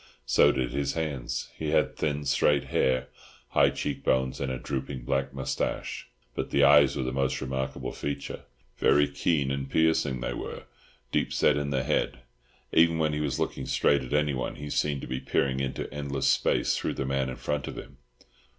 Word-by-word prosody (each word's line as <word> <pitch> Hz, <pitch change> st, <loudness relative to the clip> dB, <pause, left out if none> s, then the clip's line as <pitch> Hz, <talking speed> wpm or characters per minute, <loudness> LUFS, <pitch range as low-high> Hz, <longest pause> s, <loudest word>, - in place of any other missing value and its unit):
So -, -, +5 dB
did 65 Hz, -2 st, -1 dB
his 70 Hz, -1 st, -1 dB
hands. 75 Hz, -7 st, -3 dB
He 80 Hz, -, -3 dB
had 80 Hz, -, +2 dB
thin 75 Hz, -1 st, -1 dB
straight 70 Hz, 0 st, +3 dB
hair, 65 Hz, -1 st, +2 dB, 0.4 s
high -, -, +4 dB
cheek 70 Hz, -1 st, -4 dB
bones, 65 Hz, 0 st, +1 dB
and 70 Hz, -1 st, -1 dB
a 65 Hz, -, -2 dB
drooping 65 Hz, 0 st, -4 dB
black 70 Hz, +2 st, -1 dB
moustache. 65 Hz, -1 st, -3 dB, 0.3 s
But -, -, -3 dB
the 70 Hz, -, +3 dB
eyes 70 Hz, -1 st, +6 dB
were 65 Hz, -, -1 dB
the 65 Hz, -, -2 dB
most 65 Hz, 0 st, 0 dB
remarkable 65 Hz, -1 st, -3 dB
feature. 70 Hz, -1 st, -5 dB, 0.3 s
Very 75 Hz, 0 st, +4 dB
keen 70 Hz, -1 st, 0 dB
and 70 Hz, 0 st, -3 dB
piercing 80 Hz, -5 st, +2 dB
they -, -, -3 dB
were, -, -, -6 dB, 0.5 s
deep -, -, 0 dB
set -, -, +3 dB
in 70 Hz, -1 st, -1 dB
the 65 Hz, -2 st, 0 dB
head; 65 Hz, -1 st, 0 dB, 0.5 s
even 85 Hz, 0 st, +5 dB
when 80 Hz, -1 st, +1 dB
he 75 Hz, -, -1 dB
was 70 Hz, -3 st, -1 dB
looking -, -, -2 dB
straight 70 Hz, -, +3 dB
at 65 Hz, -, -8 dB
anyone 75 Hz, -3 st, 0 dB
he 75 Hz, 0 st, -7 dB
seemed 70 Hz, -2 st, 0 dB
to -, -, -7 dB
be 65 Hz, -, -3 dB
peering 65 Hz, 0 st, 0 dB
into 65 Hz, -1 st, -3 dB
endless 70 Hz, -1 st, -2 dB
space -, -, +2 dB
through -, -, -2 dB
the 65 Hz, -, -2 dB
man 70 Hz, -1 st, 0 dB
in 65 Hz, -, -5 dB
front 75 Hz, -2 st, -3 dB
of -, -, -6 dB
him. 65 Hz, -, -10 dB
70 Hz, 190 wpm, -28 LUFS, 65-75 Hz, 0.5 s, eyes